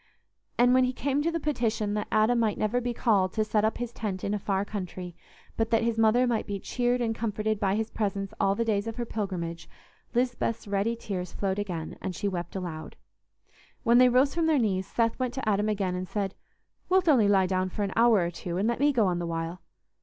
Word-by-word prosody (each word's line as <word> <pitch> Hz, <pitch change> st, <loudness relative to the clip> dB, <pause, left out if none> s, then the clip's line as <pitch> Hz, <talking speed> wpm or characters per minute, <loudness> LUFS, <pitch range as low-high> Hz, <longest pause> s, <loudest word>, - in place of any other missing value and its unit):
And 245 Hz, +1 st, +5 dB
when 255 Hz, 0 st, +5 dB
he 250 Hz, -, -1 dB
came 280 Hz, +3 st, 0 dB
to 330 Hz, +3 st, 0 dB
the 335 Hz, -, -1 dB
petition 230 Hz, -8 st, -1 dB
that 210 Hz, 0 st, -2 dB
Adam 220 Hz, +3 st, +3 dB
might 220 Hz, -3 st, +1 dB
never 230 Hz, +4 st, 0 dB
be 245 Hz, 0 st, -2 dB
called 205 Hz, -6 st, +2 dB
to 215 Hz, -, +1 dB
set 210 Hz, 0 st, +1 dB
up 220 Hz, -, +1 dB
his 245 Hz, -1 st, -4 dB
tent 205 Hz, -5 st, -4 dB
in 200 Hz, -, -1 dB
a 210 Hz, -, -1 dB
far 195 Hz, 0 st, -1 dB
country, 180 Hz, -4 st, -6 dB, 0.4 s
but 225 Hz, 0 st, 0 dB
that 230 Hz, 0 st, +2 dB
his 230 Hz, -1 st, 0 dB
mother 225 Hz, +3 st, +4 dB
might 235 Hz, -3 st, -1 dB
be 200 Hz, -1 st, -3 dB
cheered 245 Hz, +3 st, 0 dB
and 225 Hz, -1 st, 0 dB
comforted 215 Hz, -1 st, -2 dB
by 195 Hz, -1 st, +1 dB
his 220 Hz, +1 st, -2 dB
presence 200 Hz, -2 st, -2 dB
all 195 Hz, 0 st, +2 dB
the 230 Hz, +2 st, 0 dB
days 210 Hz, -1 st, 0 dB
of 225 Hz, -, -4 dB
her 240 Hz, -, -3 dB
pilgrimage, 175 Hz, -7 st, -4 dB, 0.5 s
Lisbeth's 240 Hz, -3 st, -1 dB
ready 200 Hz, +3 st, 0 dB
tears 185 Hz, -6 st, -5 dB
flowed 195 Hz, 0 st, -1 dB
again, 175 Hz, -6 st, -5 dB
and 190 Hz, -2 st, -4 dB
she 205 Hz, -, -2 dB
wept 175 Hz, -2 st, -4 dB
aloud. 175 Hz, -4 st, -5 dB, 0.9 s
When 235 Hz, +1 st, +5 dB
they 250 Hz, 0 st, +7 dB
rose 260 Hz, +3 st, +3 dB
from 330 Hz, -1 st, +1 dB
their 315 Hz, -2 st, +3 dB
knees, 195 Hz, -6 st, 0 dB
Seth 230 Hz, +3 st, 0 dB
went 255 Hz, -1 st, -2 dB
to 265 Hz, -4 st, -4 dB
Adam 210 Hz, 0 st, +2 dB
again 195 Hz, -3 st, -1 dB
and 180 Hz, 0 st, -4 dB
said, 195 Hz, -2 st, -2 dB, 0.6 s
"Wilt 370 Hz, -1 st, +3 dB
only 250 Hz, -9 st, +5 dB
lie 195 Hz, -2 st, +4 dB
down 185 Hz, 0 st, 0 dB
for 205 Hz, -, -3 dB
an 195 Hz, -, -2 dB
hour 230 Hz, -4 st, +5 dB
or 170 Hz, -, -2 dB
two, 175 Hz, 0 st, -5 dB
and 200 Hz, +4 st, +1 dB
let 235 Hz, -, 0 dB
me 290 Hz, +1 st, +4 dB
go 235 Hz, -6 st, +2 dB
on 180 Hz, -2 st, 0 dB
the 170 Hz, -, -3 dB
while?" 165 Hz, +2 st, -4 dB
215 Hz, 235 wpm, -28 LUFS, 190-235 Hz, 0.9 s, they